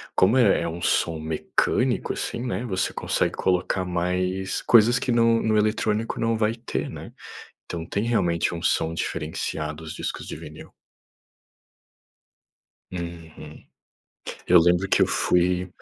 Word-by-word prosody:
como 100 +7 +4
é 105 -8 +4
é - - -2
um 85 +1 -6
som 80 0 +1
mecânico, 80 0 0
assim, 120 - -4
né, 120 0 -3
você 95 -5 -1
consegue - - -1
colocar 90 0 0
mais 90 +2 -1
coisas 120 +2 +5
que 125 - -1
no 115 -1 +3
no 110 -1 +1
eletrônico 110 +1 0
não 115 0 +1
vai 110 +1 +1
ter, 120 - -4
né. - - -9 0.5
Então 85 -2 -5
tem 100 +5 -2
realmente 90 -8 +1
um 85 - -6
som 80 +1 +1
diferenciado, 75 -1 -4
os 80 - -6
discos - - -5
de - - -6
vinil. - - -11 2.2
Uhum. 85 -3 -8 0.8
Eu 90 -1 +7
lembro 90 +3 +2
que - - +3
eu - - +5
fui, 90 +1 +1
90 Hz, 140 wpm, -24 LUFS, 85-110 Hz, 2.2 s, Eu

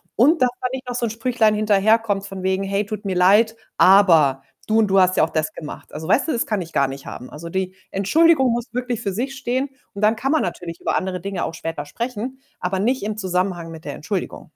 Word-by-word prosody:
Und 295 +7 +4
dass 250 - +5
da 250 - +1
nicht 255 -1 -6
noch 245 - -3
so 240 - 0
'n 230 - -1
Sprüchlein 225 -1 +2
hinterherkommt 210 0 +2
von 195 -1 -7
wegen: 190 +1 0
„Hey, 195 +1 -1
tut 210 0 -6
mir 190 -2 -1
leid, 210 +5 +4 0.2
aber 165 -9 +6 0.3
du 220 +1 +3
und 215 - +3
du 195 0 +4
hast 185 0 +4
ja - - +4
auch 160 - +1
das 155 0 -1
gemacht.“ 150 - -9
Also, 160 +1 -6
weißt 275 +10 +3
du, - - 0
das 235 - 0
kann 210 -3 -1
ich 165 -1 -9
gar 140 -1 +2
nicht 135 +1 -8
haben. 125 - -8
Also, 160 +3 -9
die 190 +1 -2 0.2
Entschuldigung 265 - +4
muss 240 +1 -3
wirklich 250 -2 -2
für 200 - -2
sich 255 +7 -3
stehen 260 +2 -1 0.2
und 200 - -7
dann 220 +1 +4
kann 270 +6 0
man 315 - +3
natürlich 170 -1 -5
über - - 0
andere 185 -2 -3
Dinge 195 -2 -3
auch - - -5
später 165 -2 -5
sprechen, 245 - -5 0.2
aber 185 +1 -2
nicht 245 +5 0
im 210 0 -2
Zusammenhang 180 -3 -2
mit 160 -1 -11
der 145 - -4
Entschuldigung. 185 +3 -4
200 Hz, 245 wpm, -21 LUFS, 180-235 Hz, 0.3 s, aber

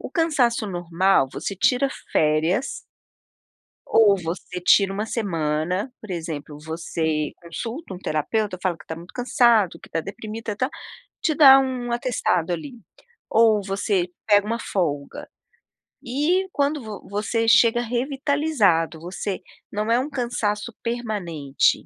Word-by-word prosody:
O - - -7
cansaço 280 - +1
normal 175 -3 +2
você 195 - -4
tira 250 +8 +2 0.2
férias 160 - +1 1.1
ou 215 -3 +5
você 175 +2 -5
tira 195 +2 +4
1 210 +2 -2
semana 180 - -1
por 215 - -8
exemplo, 160 -4 -5
você 160 -1 -2
consulta 225 - -6
um 180 - -7
terapeuta, 185 +5 -1
fala 180 -3 0
que - - -16
tá 160 - -4
muito 170 +2 -12
cansado, 235 - +3
que - - -14
tá 165 - -1
deprimida, 215 +3 -6
tá 255 +5 -1 0.5
te 315 - +2
dá 275 -3 +9
um 255 -2 -2
atestado 235 -8 0
ali. 175 - -5 0.6
Ou 220 -2 +4
você 195 -2 0 0.2
pega 205 -1 +4
1 230 +2 -1
folga. 145 -10 -3 0.8
E, 300 +9 +1
quando 285 +1 0
vo 215 -2 -9
você 215 +3 -1
chega 230 +1 +5
revitalizado, 250 - +1
você 185 +3 -4 0.3
não 210 +2 -1
é 235 - +4
um 270 +4 -2
cansaço 235 -5 -2
permanente. 195 - 0
210 Hz, 130 wpm, -23 LUFS, 175-240 Hz, 1.1 s, dá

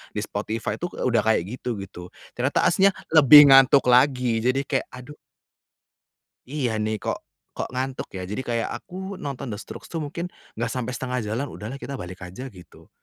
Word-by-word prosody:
di - - -1
Spotify 105 +2 -3
itu 175 - -2
udah 120 -3 +1
kayak 110 -5 +3
gitu 120 -5 -4
gitu. 90 -2 -10 0.3
Ternyata - - +1
aslinya 195 +3 +4 0.2
lebih 150 -1 +10
ngantuk 135 0 +7
lagi 125 -2 +3
jadi 130 +3 +1
kayak, 135 -3 -1
aduh. 125 +4 -11 1.3
Iya 125 -5 -2
nih, 110 0 -1
kok - - -2 0.4
kok - - -2
ngantuk 130 +1 -3
ya? 95 - -5
Jadi, 105 +6 -3
kayak 115 -1 -1
aku 190 +1 -7
nonton 140 -3 -5
The 105 - -5
Strokes 100 - -10
tuh 165 - -3
mungkin 165 +4 -5 0.2
enggak 115 +1 -2
sampai 125 0 -3
setengah 125 +1 -3
jalan, 115 +7 -2
udahlah 110 +5 -7
kita 140 -1 -6
balik 90 +1 -8
aja 90 +9 -8
gitu. 90 -9 -15
125 Hz, 175 wpm, -24 LUFS, 110-140 Hz, 1.3 s, lebih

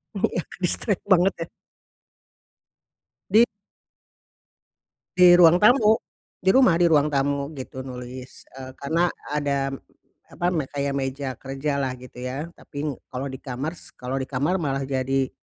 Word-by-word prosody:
Iya. 195 -3 0 0.2
Distract 195 +3 0
banget, 185 +1 +5
ya? 165 - -3 1.8
Di 220 +3 +7 1.7
Di 180 -1 +8
ruang 170 0 +8
tamu. 220 -2 +6 0.5
Di 190 - +5
rumah, 255 -10 +5
di 170 -1 +3
ruang 150 -1 +4
tamu, 140 0 0
gitu, 130 0 -8
nulis, 125 +1 -9
eee, 130 0 -9
karena 165 +5 +1 0.3
ada, 140 -2 0 0.6
apa, 175 - -5
me 155 -5 -1
kayak 140 -1 -2
meja 135 +1 -3
kerja 140 +1 -3
lah, 130 -1 -2
gitu 125 0 -13
ya. 140 +7 -5
Tapi, 145 -2 -7 0.2
kalau 130 +2 -4
di 130 - -8
kamar 135 +4 -4
s - - -18
kalau 130 +2 -4
di 130 - -4
kamar, 150 +8 0
malah 135 -3 -1
jadi, 135 0 -1
140 Hz, 140 wpm, -24 LUFS, 130-170 Hz, 1.8 s, Di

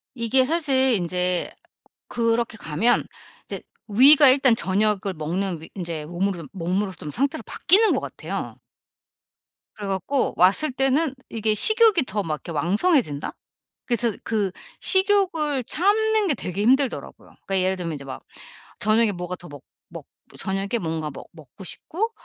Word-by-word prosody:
이게 255 +2 +2
사실 270 -5 +2
인제 180 -1 -1 0.6
그렇게 230 -1 -1
가면 170 +8 +1 0.4
이제 - - -6 0.3
위가 275 +7 +8
일단 260 -2 +5
저녁을 200 -1 0
먹는 170 +2 -3
위 - - -12
인제 170 -5 -5
몸으로 175 +1 -3
몸으로 190 +2 -2
좀 155 -4 -8
상태로 280 - -2
바뀌는 430 +3 +4
것 - - 0
같아요. - - -6 1.2
그래 205 -2 -7
갖고 195 +9 -1
왔을 195 - +3
때는 270 +3 +1 0.2
이게 220 -1 0
식욕이 435 - +4
더 205 +1 -2
막 155 -3 -2
이렇게 170 - -10
왕성해진다? 175 - 0 0.5
그래서 235 -2 +1
그 210 -4 -1 0.3
식욕을 370 - +1
참는 425 - +1
게 315 - +2
되게 190 -4 -4
힘들더라고요. 265 +2 0 0.2
그러니까 195 -1 0
예를 190 +1 0
들면 170 -3 -4
이제 140 -2 -9
막 135 - -8 0.6
저녁에 215 0 +2
뭐가 180 0 -6
더 175 - -13
먹 145 -2 -12 0.3
먹 - - -10 0.3
저녁에 195 +1 -3
뭔가 160 -2 -3
먹 - - -11
먹고 155 +2 -14
싶고 375 - -3
210 Hz, 300 characters per minute, -23 LUFS, 180-275 Hz, 1.2 s, 위가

